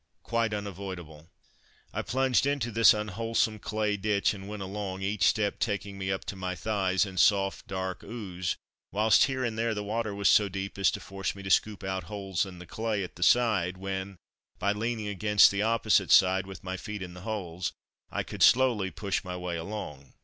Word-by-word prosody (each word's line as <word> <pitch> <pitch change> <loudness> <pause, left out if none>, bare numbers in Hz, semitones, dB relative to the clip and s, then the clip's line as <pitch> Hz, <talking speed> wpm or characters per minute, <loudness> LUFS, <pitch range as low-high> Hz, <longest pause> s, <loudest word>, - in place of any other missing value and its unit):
Quite 115 -2 0
unavoidable. 95 -6 -6 0.6
I - - -1
plunged 130 +1 +1
into 140 -5 0
this 115 +1 +7
unwholesome 110 +1 0
clay 105 -1 -1
ditch 100 0 +1
and 100 -1 -9
went 105 -2 -5
along, 95 -1 -5
each 100 -1 +2
step 105 -2 +1
taking 100 -4 -2
me 95 0 -2
up 95 - -3
to - - -5
my 90 -1 -3
thighs 95 -3 +1
in 95 -2 -5
soft 95 0 +3
dark 95 -2 -4
ooze, 95 -6 -4 0.4
whilst 110 +4 +5
here 130 -1 -2
and 110 -1 -3
there 115 -1 0
the 105 - -3
water 110 0 -2
was 100 -1 +1
so 105 +3 +5
deep 95 +1 -5
as 95 - +5
to - - -3
force 95 0 -4
me 100 - -9
to 95 - -3
scoop 105 +2 +2
out 95 -2 -3
holes 95 -1 -2
in 90 -2 -10
the 90 - -10
clay 110 +2 -2
at 90 - -8
the 85 - -13
side 95 -4 +3
when, 95 0 -4 0.4
by 100 - +1
leaning 110 +1 -2
against 105 +1 +5
the 100 0 -1
opposite 110 0 +2
side, 95 0 +5
with 95 - -9
my 95 0 -4
feet 105 -2 -6
in 90 -1 -8
the 90 - -10
holes, 95 -5 -3 0.4
I - - -2
could - - -8
slowly 120 -7 +5
push 100 +3 -2
my 90 -1 -5
way 90 -1 -3
along. 80 -7 -6
100 Hz, 200 wpm, -29 LUFS, 95-110 Hz, 0.6 s, this